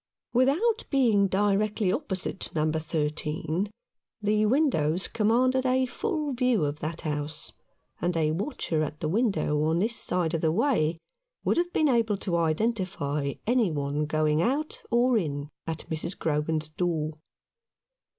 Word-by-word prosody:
Without 315 - +3
being 225 -8 +4
directly 205 +1 +1
opposite 195 - -2
No. 155 0 +2
13, 155 +3 -2 0.5
the 210 0 +2
windows 195 - +2
commanded 250 +4 +2
a 260 0 +2
full 305 - -2
view 250 - +2
of 145 +1 -3
that 155 +2 -4
house, 150 -1 -3 0.5
and 175 -1 0
a 155 -1 +2
watcher 165 - -1
at 150 0 -3
the 155 - -2
window 195 -6 +1
on 160 +2 +2
this 220 +6 0
side 180 -6 0
of 165 - 0
the 160 - +2
way 170 - +1 0.5
would - - +1
have 350 +1 +1
been 310 - +2
able 230 -6 +2
to 185 -3 -2
identify 160 - -1
any 235 -3 +3
one 145 0 -1
going 155 0 +2
out 285 - -1
or 240 0 +3
in 145 -4 -3 0.2
at 160 -1 -4
Mrs. 160 +3 -3
Grogan's 155 0 -1
door. 155 -2 -2
180 Hz, 140 wpm, -27 LUFS, 155-235 Hz, 0.5 s, being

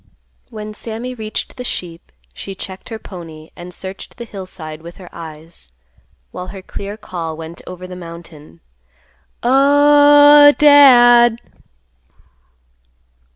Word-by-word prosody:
When 215 -2 -8
Sammy 230 +3 -6
reached 220 +1 -6
the 250 - -6
sheep, 170 - -7 0.2
she 195 - -9
checked 190 0 -10
her 225 - -6
pony, 165 -6 -12
and 175 0 -10
searched 190 +1 -9
the 240 - -7
hillside 180 -7 -9
with 170 +1 -12
her 185 -2 -13
eyes, 160 - -12 0.6
while 180 0 -8
her 195 -1 -10
clear 200 +2 -8
call 165 -6 -7
went 165 +1 -10
over 185 0 -9
the 180 0 -9
mountain, 170 - -13 0.8
"Oh—h—h—Dad!" 285 -3 +6
195 Hz, 110 wpm, -17 LUFS, 170-245 Hz, 0.8 s, Oh—h—h—Dad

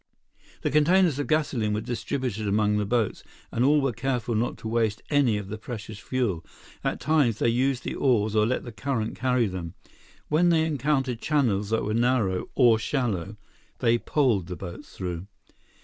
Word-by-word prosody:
The - - 0
containers 155 +1 +4
of 145 - -2
gasoline 135 -9 +1
were - - 0
distributed 115 -1 -3
among 105 +1 +2
the 105 -1 -1
boats, 115 -2 0 0.3
and 120 - 0
all 145 +2 +4
were 135 -3 0
careful 125 -1 -2
not 115 +3 -1
to 115 - -7
waste 110 -2 0
any 135 -7 +3
of 105 -2 -5
the 110 +2 -6
precious 110 -2 -7
fuel. 105 -9 -1 0.4
At - - -1
times, 145 -8 +2
they 115 - +2
used 130 +2 +1
the - - -3
oars 110 -5 +1
or 105 0 +4
let 130 - -1
the 120 - -7
current 115 -2 -2
carry 125 -1 +1
them. 90 -4 -5 0.5
When 170 +4 +3
they 160 -2 +3
encountered 135 -5 0
channels 115 -10 +1
that 110 0 +1
were 105 - -1
narrow 115 -5 +1
or 120 -4 +5
shallow, 105 - -2 0.4
they 120 -1 +2
poled 115 - +1
the 90 - -5
boats 90 +10 -9
through. 90 -1 -4
115 Hz, 180 wpm, -26 LUFS, 105-135 Hz, 0.5 s, or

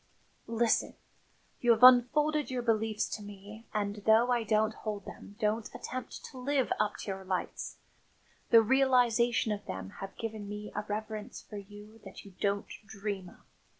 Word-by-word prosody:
"Listen. 230 0 +1 0.6
You 240 - 0
have 225 +2 -2
unfolded 295 +5 +6
your 250 -2 -2
beliefs 220 -2 +1
to - - -5
me 205 +2 -11
and, 205 -1 -2
though 225 +3 +5
I 240 -2 +2
don't 220 0 +2
hold 210 -3 -5
them 205 - -10
don't 215 0 0
attempt 255 0 -6
to 260 - -10
live 270 0 +1
up 210 0 +1
to 200 - -4
your 190 0 -6
lights 185 - -3 0.7
the 230 -1 +8
realisation 245 -2 +3
of 205 -1 -4
them 95 0 -5
has 195 - -4
given 220 -3 -5
me 210 0 -6
a - - -2
reverence 215 0 -5
for 210 - -8
you 205 +2 -12
that - - -11
you 200 - -12
don't 200 0 0 0.2
dream 195 -2 -5
of. - - -19
215 Hz, 165 wpm, -31 LUFS, 205-240 Hz, 0.7 s, the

